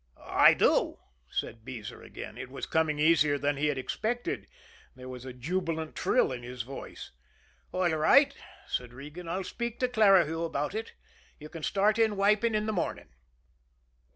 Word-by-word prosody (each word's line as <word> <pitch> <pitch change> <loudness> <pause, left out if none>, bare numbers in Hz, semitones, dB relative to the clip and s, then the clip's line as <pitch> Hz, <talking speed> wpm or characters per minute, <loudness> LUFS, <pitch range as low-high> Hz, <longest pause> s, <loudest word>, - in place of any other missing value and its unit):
"I - - +6
do," - - +2 0.3
said 115 -1 -4
Beezer 115 -3 -8
again. - - -9
It 130 - -7
was 135 - -6
coming 160 -2 +1
easier 150 -2 +4
than 145 +1 0
he 150 +2 +1
had 145 -2 0
expected 230 - -3 0.5
there 130 0 -10
was 125 0 -8
a 130 - -6
jubilant 160 +4 -3
trill - - +2
in 125 -1 -5
his 125 0 -6
voice. 135 +3 -9 0.6
"All 185 -1 +1
right," 275 - +5 0.3
said 125 -1 -3
Regan. 150 +6 -9
"I'll 190 +3 -2
speak 235 +5 -4
to 255 - +2
Clarihue 195 -9 +4
about 150 0 -2
it. 220 +1 -5 0.5
You 150 0 -10
can 165 - -8
start 205 +6 +2
in 220 -3 +3
wiping 210 +3 +3
in 210 0 0
the 215 - -1
morning." 180 - -3
160 Hz, 165 wpm, -29 LUFS, 135-205 Hz, 0.6 s, I